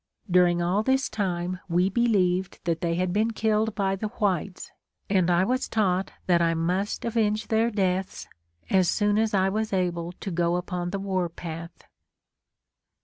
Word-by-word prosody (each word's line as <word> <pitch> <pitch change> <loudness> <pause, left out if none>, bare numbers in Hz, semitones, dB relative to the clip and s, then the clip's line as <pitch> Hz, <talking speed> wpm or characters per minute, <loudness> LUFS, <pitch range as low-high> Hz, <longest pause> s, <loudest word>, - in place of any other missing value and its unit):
During 175 -1 +4
all 185 +4 +1
this 265 +3 +1
time 180 -3 -2
we 175 +2 +3
believed 190 -4 +1
that 165 -2 -1
they 170 -1 0
had 180 0 -1
been 215 +3 +2
killed 220 0 0
by 195 -2 0
the 215 +3 -3
whites, 200 -4 -2 0.4
and 185 -3 +3
I 175 +1 +3
was 255 +6 -1
taught 190 -4 0
that 175 -2 +3
I 165 0 +2
must 180 +5 -1
avenge 220 -2 0
their 225 +1 +2
deaths 190 -3 -1 0.4
as 185 -2 +4
soon 205 0 +2
as 220 -1 +1
I 190 0 +3
was 215 +2 -2
able 175 -2 -1
to 195 +2 -6
go 170 0 +1
upon 180 0 -3
the 200 - -3
war 190 -3 -1
path. 165 0 -8
190 Hz, 165 wpm, -26 LUFS, 175-210 Hz, 0.4 s, During